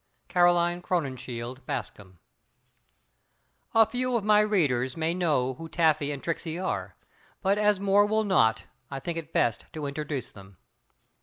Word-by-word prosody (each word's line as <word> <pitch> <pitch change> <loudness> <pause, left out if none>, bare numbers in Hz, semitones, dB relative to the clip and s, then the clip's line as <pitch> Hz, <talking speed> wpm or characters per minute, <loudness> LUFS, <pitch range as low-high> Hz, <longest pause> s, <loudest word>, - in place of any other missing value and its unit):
CAROLINE 175 -1 +3
CROWNINSHIELD 130 -7 -4
BASCOM. 95 -3 -6 1.6
A 225 0 +7
few 250 +2 -1
of 220 - -3
my 210 0 +5
readers 145 - +1
may 165 +1 0
know 150 -8 +1
who 165 +5 -9
Taffy 155 -4 +2
and 140 -2 -6
Tricksey 165 -1 -3
are, 185 +1 -3 0.5
but 200 +2 +2
as 210 -2 +3
more 200 +1 +4
will 220 +1 +1
not 115 - +3 0.3
I 135 - -5
think 165 +4 -4
it 165 - -10
best 115 - 0
to 155 -2 -5
introduce 140 -2 -4
them. 95 -2 -15
165 Hz, 145 wpm, -27 LUFS, 130-190 Hz, 1.6 s, A